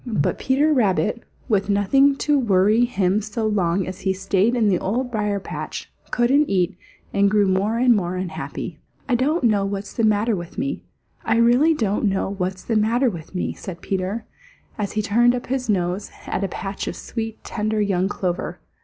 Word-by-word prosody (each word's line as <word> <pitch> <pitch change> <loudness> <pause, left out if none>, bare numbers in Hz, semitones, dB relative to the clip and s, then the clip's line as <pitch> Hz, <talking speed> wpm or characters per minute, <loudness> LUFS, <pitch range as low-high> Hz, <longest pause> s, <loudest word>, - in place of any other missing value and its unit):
But 210 -11 0
Peter 290 +4 +2
Rabbit, 215 -2 +1 0.3
with 205 -4 +1
nothing 270 +8 +4
to 290 0 +1
worry 215 +1 +3
him 200 -3 +1
so 215 +2 -3
long 190 -3 +1
as 185 - -6
he 190 - 0
stayed 195 +4 +1
in 230 -3 +2
the 185 -3 +2
Old 245 +6 -2
Briar 210 -3 -1
patch, - - -6 0.2
couldn't 270 +5 +3
eat 185 -1 +1 0.4
and 200 0 +4
grew 205 0 +3
more 195 +4 +1
and 245 0 +5
more 180 -3 -1
unhappy. 185 -2 -5 0.3
"I 255 - 0
don't 275 +6 +1
know 210 -4 +3
what's 200 0 -4
the 230 - -1
matter 215 +1 +2
with 175 -2 -8
me. 275 +1 -2 0.4
I 225 - +1
really 245 +8 +4
don't 210 -5 0
know 195 -1 0
what's 185 -1 -3
the 225 - -1
matter 230 +4 +2
with 170 0 -10
me," 180 - -1
said 175 -3 -8
Peter, 195 +4 -2 0.5
as 205 -2 -3
he 215 - 0
turned 240 +4 +3
up 245 - -4
his 255 -2 -2
nose 185 0 0 0.2
at - - -2
a - - +1
patch 195 +1 -5
of - - -3
sweet, 225 -1 -6
tender 215 0 -2
young 195 -2 +1
clover. 180 -3 -3
210 Hz, 190 wpm, -22 LUFS, 190-235 Hz, 0.5 s, and